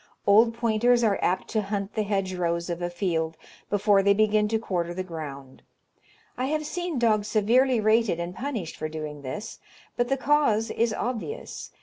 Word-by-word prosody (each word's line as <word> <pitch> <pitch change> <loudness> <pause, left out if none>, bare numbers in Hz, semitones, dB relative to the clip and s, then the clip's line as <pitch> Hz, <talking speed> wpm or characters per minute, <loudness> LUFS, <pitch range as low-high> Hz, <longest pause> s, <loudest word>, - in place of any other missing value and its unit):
Old 225 +3 +5
pointers 235 +1 +2
are 210 -3 +2
apt 185 +1 0
to 215 - 0
hunt 200 0 -3
the 215 - 0
hedgerows 185 -4 -1
of 170 +1 -4
a 175 - -1
field 165 -3 -2 0.3
before 205 -1 +3
they 200 +1 +4
begin 215 0 +3
to 225 +1 +1
quarter 175 -5 -2
the 185 - -2
ground. 140 -6 -8 0.8
I 255 - +1
have 305 +2 -1
seen 345 0 -3
dogs 215 -3 +2
severely 235 +4 +3
rated 215 -4 +2
and 170 +1 -4
punished 230 - -4
for 155 - -4
doing 155 -2 -6
this, 205 +12 -6 0.4
but 240 - +1
the 270 +2 +1
cause 265 -6 +2
is 230 0 +1
obvious. 250 - -4
210 Hz, 175 wpm, -26 LUFS, 175-235 Hz, 0.8 s, Old